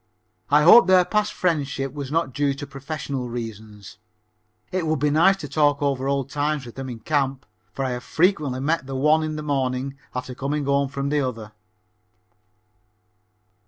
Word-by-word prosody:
I 150 +1 +5
hope 190 +5 +8
their 185 -1 +5
past 210 +1 0
friendship 140 -6 -1
was 140 -2 -6
not 160 -5 0
due 140 0 0
to 145 - -7
professional 140 -2 -5
reasons. 105 -5 -8 0.7
It 180 -3 -1
would 155 0 +1
be 145 +1 +1
nice 180 +6 +4
to 150 - -7
talk 145 0 +2
over 135 -2 -1
old 140 -2 0
times 145 -1 -1
with 120 - -10
them 135 0 -6
in 115 -2 -8
camp, 135 -1 -1 0.3
for 135 - -3
I 130 - -1
have 125 0 -4
frequently 155 -7 +1
met 155 0 0
the 135 - -5
one 150 +4 +3
in 155 0 -3
the 155 - -5
morning 135 -1 -2 0.2
after 125 0 -4
coming 140 +3 -2
home 140 0 +2
from 140 0 -3
the 145 0 +1
other. 115 -5 -4
140 Hz, 175 wpm, -23 LUFS, 130-150 Hz, 0.7 s, hope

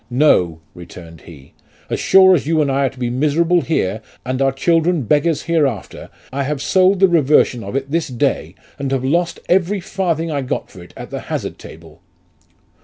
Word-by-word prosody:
' - - -39 0.2
No,' 85 -2 +1
returned 85 -2 -12
he, 70 -5 -14 0.2
' - - -32
as - - -1
sure 190 0 +6
as 150 -5 0
you 160 0 +1
and 145 -2 +1
I 135 +1 +1
are - - -2
to 130 - -19
be 120 -1 -2
miserable 160 +6 +1
here, 110 - -1 0.2
and 130 +1 -2
our 135 0 +3
children 165 +3 +1
beggars 150 +5 +1
hereafter, 145 - -2 0.2
I 140 - -2
have 140 +1 -2
sold 185 +5 +2
the 195 - +6
reversion 150 -7 +2
of 100 +6 -7
it 135 0 -3
this 165 0 0
day, 125 -4 -2 0.2
and 140 -1 -3
have 130 -1 -1
lost 170 +4 0
every 190 +2 +1
farthing 170 -3 -2
I 145 -2 -1
got 130 - -4
for 95 - -13
it 85 - -15
at - - -9
the - - -4
hazard - - -4
table.' 80 0 -14
140 Hz, 200 wpm, -18 LUFS, 125-170 Hz, 0.2 s, sure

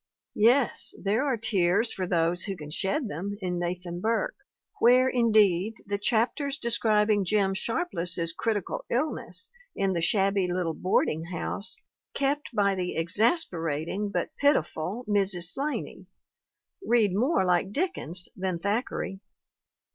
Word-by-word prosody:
Yes, 240 +3 +4
there 210 +6 +1
are 260 -4 +1
tears 210 0 +2
for 185 -1 -3
those 170 0 +1
who 195 -3 -4
can 150 -2 -9
shed 220 - -1
them 200 +4 -5
in 180 -3 -2
Nathan 175 0 -4
Burke, 230 - 0 0.5
where, 250 +2 +6
indeed, 215 -5 +3
the 200 0 -2
chapters 245 +7 0
de 235 - -3
scribing 215 -3 +2
Jim 195 +1 +2
Sharpless's 180 - -1
critical 210 -1 -2
illness 235 - -2 0.2
in 195 -1 0
the 170 - -1
shabby 195 0 +2
little 175 -2 -1
boarding 160 -2 0
house 180 +4 -4 0.4
kept 285 +1 0
by 200 -4 +2
the 180 -2 -3
exasperating 170 - 0
but - - -3
piti 285 - +4
ful 185 +12 -5
Mrs. 195 -4 +1
'Slaney 280 +8 -3 0.8
read 225 - +3
more 230 - +2
like 180 +2 +1
Dickens 205 - -2
than 185 -2 -2
Thack 205 +8 -1
eray. 190 - -4
200 Hz, 135 wpm, -27 LUFS, 180-230 Hz, 0.8 s, where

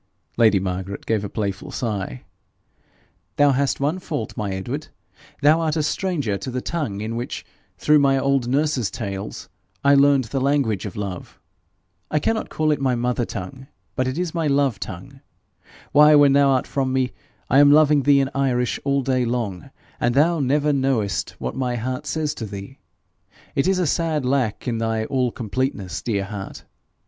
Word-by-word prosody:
Lady 110 -4 +4
Margaret 95 +1 -4
gave 110 -2 0
a 100 - -4
playful 100 -3 -3
sigh. 100 - -4 1.1
'Thou 145 -1 +5
hast 140 +1 0
one 150 +6 0
fault, 145 -10 -5
my 105 -2 -3
Edward 120 +11 -4 0.6
thou 155 +3 +5
art 160 -1 0
a 155 - 0
stranger 150 - -1
to 100 - -5
the 125 0 -2
tongue 125 -10 -3
in 110 +2 -4
which, 120 +1 -5 0.3
through 150 0 +4
my 135 -1 +3
old 135 -2 +1
nurse's 135 -3 +1
tales, 100 -2 -6 0.4
I 140 - +5
learned 140 -1 +5
the 130 +4 -3
language 130 -8 +1
of 95 - -9
love. 100 -4 -6 0.7
I 150 - 0
cannot 220 +9 -1
call 155 0 0
it 150 - 0
my 130 -2 +2
mother 120 0 0
tongue, 110 +9 -7 0.3
but 130 -1 0
it 130 +3 -3
is 175 -2 -2
my 165 -3 0
love 140 -7 +1
tongue. - - -8 0.7
Why, 150 +1 +7
when 145 -2 +6
thou 140 0 +5
art 130 -2 +2
from 135 -2 -1
me, 130 -1 0 0.4
I 135 - +4
am 145 0 +7
loving 150 -1 +5
thee 140 0 +4
in 135 0 -2
Irish 125 -3 0
all 140 -1 +1
day 130 -1 +1
long, 115 -8 -3 0.3
and 120 0 +1
thou 165 +4 +3
never 145 +2 +2
knowest 130 -7 0
what - - -4
my 125 -2 -1
heart 125 +2 -4
says 155 -2 -1
to 110 - -3
thee! 100 +6 -9 0.7
It 135 - +1
is 190 0 +2
a 180 - +1
sad 155 -2 0
lack 125 -5 0
in 115 -2 -1
thy 110 -1 -1
all 125 -1 0
completeness, 110 -5 -3
dear 100 -4 -1
heart. 100 -1 -7
130 Hz, 180 wpm, -22 LUFS, 110-145 Hz, 1.1 s, Why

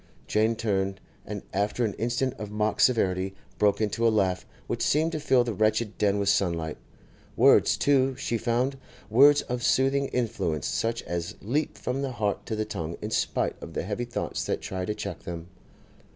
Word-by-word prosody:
Jane 110 +2 +2
turned, 95 -3 -1 0.3
and - - -5
after 105 +4 0
an 105 - -2
instant 120 +3 -1
of 105 - -5
mock 105 0 -1
severity, 95 -5 +2 0.2
broke 105 -1 +3
into 110 +2 +1
a - - +6
laugh 95 -4 +1 0.2
which - - -3
seemed 160 +3 +2
to 155 - -3
fill 130 -4 +3
the 120 -2 -3
wretched 110 +1 +1
den 105 -1 +2
with 100 -1 -1
sunlight. 85 -5 +1 0.6
Words, - - +5
too, 135 -2 +3
she 120 -3 -2
found; 125 +4 0 0.3
words 140 +5 +6
of 125 0 -3
soothing 135 +2 +2
influence 100 - -1
such 115 +1 -1
as 85 +3 -4
leap 140 +9 -1
from 130 +2 -2
the 135 -2 -2
heart 105 -3 -2
to 110 - -2
the 110 0 -1
tongue 85 -5 -5
in 105 - -5
spite - - -1
of 85 - -8
the - - -1
heavy 105 +5 -3
thoughts 120 - -3
that - - -1
try 95 -1 -4
to 105 - -2
check 100 -5 -5
them. 85 0 -7
110 Hz, 185 wpm, -27 LUFS, 100-125 Hz, 0.6 s, a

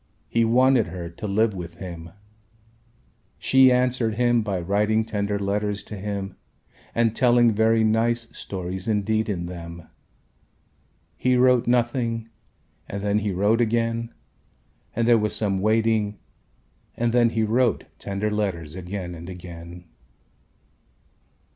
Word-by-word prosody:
He 115 - +2
wanted 125 +1 +4
her 85 -2 -7
to 105 +5 -6
live 105 +2 +2
with 85 -2 -7
him. 85 -2 -8 1.3
She 130 -1 +5
answered 125 -3 +1
him 120 0 +3
by 100 -4 -2
writing 105 +5 +1
tender 105 -2 -2
letters 100 0 -1
to 105 - -8
him 100 -1 -5 0.6
and 115 -1 +2
telling 120 -1 +4
very 110 +1 +3
nice 115 +2 +2
stories 95 0 -5
indeed 110 +1 0
in 85 -4 -2
them. 85 -1 -8 1.3
He 125 0 +2
wrote 125 -1 +4
nothing 120 -2 0 0.6
and 100 0 -5
then 105 0 +2
he 105 0 -2
wrote 105 +5 +2
again 115 0 0 0.8
and 115 0 +1
there 120 -1 +6
was 105 0 -1
some 100 -3 0
waiting 110 0 +1 0.8
and 120 0 0
then 120 -1 +4
he 115 -1 0
wrote 120 +4 +1 0.2
tender 100 +2 -2
letters 95 -7 -2
again 90 0 -6
and 85 +1 -9
again. 85 -1 -10
105 Hz, 130 wpm, -24 LUFS, 95-115 Hz, 1.3 s, there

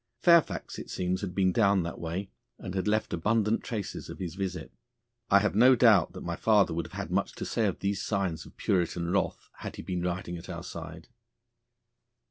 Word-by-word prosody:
Fairfax 170 -2 +3
it - - -8
seems 90 +1 -1
had 90 -3 -5
been 95 -2 +3
down 100 -2 +3
that 85 - -5
way, 90 +4 -4 0.3
and 90 - -7
had 95 +1 -1
left 110 +1 0
abundant 105 +5 +1
traces 105 -5 -5
of - - -7
his 90 -4 -5
visit. 95 -1 -4 0.6
I 100 - +7
have 105 - +1
no 125 +5 +6
doubt 110 -7 +5
that - - -8
my 85 0 -3
father 105 -2 +3
would 85 +1 -3
have - - -18
had - - -5
much - - 0
to - - -6
say 110 -2 0
of 95 - -3
these 100 -1 -1
signs 95 -7 -1
of - - -18
Puritan 85 -2 0
wrath 100 0 -1
had - - -7
he - - -8
been 90 -1 -3
riding 90 -1 -3
at 85 - -12
our 85 -1 -6
side. 80 -1 -8
95 Hz, 205 wpm, -29 LUFS, 85-105 Hz, 0.6 s, I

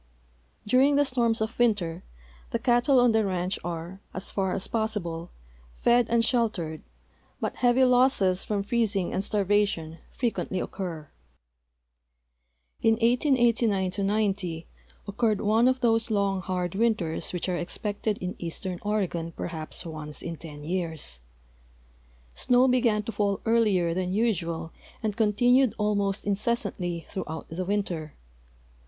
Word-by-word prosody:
During 260 +6 +4
the 290 0 +4
storms 235 -4 +1
of 220 +2 -3
winter 190 -8 +1 0.5
the - - 0
cattle 245 +2 +3
on 245 -1 +5
the 220 0 +3
ranch 185 -1 -1
are, 175 +3 -5
as 190 - -3
far 190 -2 0
as 190 - -2
possilde, 195 -7 -2 0.5
fed 240 -1 +3
and 230 0 +4
sheltered, 210 - 0 0.6
but - - -3
heavy 250 +1 +4
losses 250 -7 +3
from 205 -2 -1
freez 225 0 0
ing 185 -3 -1
and 190 - 0
starvation 200 -6 0
frequently 230 -6 -2
occur. 165 -7 -5 1.7
In 225 - +4
1889 235 -5 +2
'9U 195 -4 -1 0.4
occurred 210 0 +1
one 220 +4 +3
of 260 0 +1
those 225 -1 +2
long, 200 -3 +1
hard 180 -2 -2
winters 200 -6 0
which 180 0 -3
are 180 - 0
expected 205 +4 -3
in 180 +1 -4
eastern 175 +1 -4
Oregon 185 -6 -1
perhaps 160 +1 -5
once 155 -2 -5
in 170 - -4
ten 150 -2 -10
years. 160 - -3 1.1
Snow 250 - +3
began 235 -4 +2
to 230 - -4
fall 200 -2 0
earlier 210 -7 +3
than 180 +1 -2
usual 170 -7 -1 0.3
and 215 -2 -1
continued 245 +3 +3
almost 205 -2 0
incessantly 195 -5 -2
throughout 160 -5 -5
the 175 +3 -4
winter. 175 -6 -2
200 Hz, 130 wpm, -27 LUFS, 175-230 Hz, 1.7 s, on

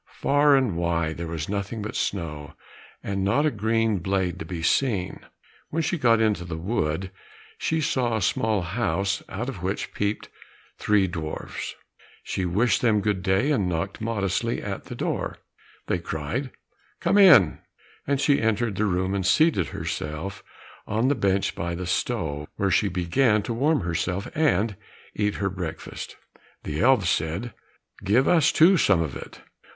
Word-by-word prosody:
Far 145 0 +4
and 130 -9 +1
wide 85 -2 -1
there 85 0 -4
was 80 -2 -4
nothing 100 +2 -3
but 110 - -5
snow, 75 -6 -3 0.5
and 95 -1 -2
not 120 +10 +2
a 155 - +2
green 110 -1 +1
blade 95 0 -1
to 80 - -5
be 85 -1 -5
seen. 100 -2 +1 0.5
When 165 +1 -1
she 170 +1 -1
got 115 -4 +4
into 105 -5 +1
the 85 -2 -5
wood 90 -1 -2 0.5
she 160 0 0
saw 125 -5 0
a - - -3
small 105 0 +1
house 100 0 -1
out 120 +5 -4
of 110 -10 -6
which 95 +2 -3
peeped 105 +1 -2 0.5
three 105 -2 +3
dwarfs. 80 -4 -5 0.5
She 95 - -2
wished 105 +8 +2
them 110 -4 +3
good 105 -2 0
day, 95 +9 +2
and 100 -11 +1
knocked 90 +5 -3
modestly 110 0 -1
at - - -5
the - - -7
door. - - -3 0.5
They 90 - 0
cried, 85 - -3 0.5
"Come 205 - +3
in," 175 - +7 0.5
and 140 -1 +1
she 140 0 +3
entered 110 -2 0
the 110 - +1
room 95 -1 0
and 100 -1 -1
seated 100 - +3
herself 80 +8 -5 0.4
on 110 +5 +1
the - - +4
bench 100 -6 0
by 85 0 -3
the 90 +1 -5
stove, 80 -6 -2
where 100 -1 0
she 100 +3 +3
began 105 +5 +2
to 115 - -3
warm 145 +5 +2
herself 90 +2 -2
and 115 - +1 0.4
eat 105 -1 0
her 100 0 -1
breakfast. 90 -4 -6 0.5
The 75 +1 -3
elves 120 -6 +4
said, 85 +10 -2 0.5
"Give 115 +7 +3
us, 165 -4 +4
too, 180 +4 +6
some 95 - +3
of 75 -6 -5
it." - - -10
100 Hz, 165 wpm, -25 LUFS, 90-120 Hz, 0.5 s, in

